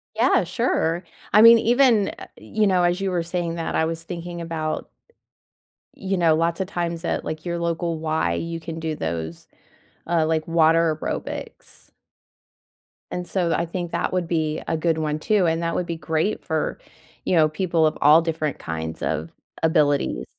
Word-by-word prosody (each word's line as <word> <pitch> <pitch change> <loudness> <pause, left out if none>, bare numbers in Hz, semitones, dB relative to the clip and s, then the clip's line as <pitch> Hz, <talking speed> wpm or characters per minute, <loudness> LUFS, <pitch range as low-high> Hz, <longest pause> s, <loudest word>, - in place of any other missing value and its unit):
Yeah, 230 -1 +3
sure. 175 -3 0 0.3
I 210 - +7
mean, 230 +1 +10
even, 235 -2 +4
u - - -3
uh, - - -10
you 215 -1 0
know, 185 -2 +3
as 175 +2 +1
you 195 - 0
were 175 -2 -1
saying 170 0 -3
that 165 -1 -3
I 160 - +2
was 165 0 -3
thinking 170 0 -6
about 160 -2 -3 1.1
you 195 -1 -2
know, 165 -3 +4
lots 165 +2 0
of 190 - -1
times 170 -2 -3
at, - - -1
like, 155 +1 -5
your 170 -1 -2
local 170 -1 -2
Y, 155 - 0
you 165 - -3
can 165 0 -7
do 160 -1 -3
those, 80 - -5 0.6
uh, 165 -2 +2
like, 160 0 0
water 165 -1 +3
aerobics - - -6 1.2
and 180 0 -4
so, 175 -3 0
I 170 - 0
think 175 0 -5
that - - -1
would 180 -2 0
be 160 -2 -1
a 160 - 0
good 160 0 +1
one 155 -1 -1
too, 205 +3 +2
and 165 0 +1
that 170 - -1
would 180 - -1
be 170 -1 -4
great 160 +5 -1
for, 160 -1 -1 0.5
you - - +1
know, 155 -2 +5
people 165 0 +1
of 155 - 0
all 150 +3 +7
different 160 -3 -2
kinds 80 0 -5
of 80 +2 -2 0.3
abilities. 145 - +2
165 Hz, 185 wpm, -23 LUFS, 155-175 Hz, 1.2 s, mean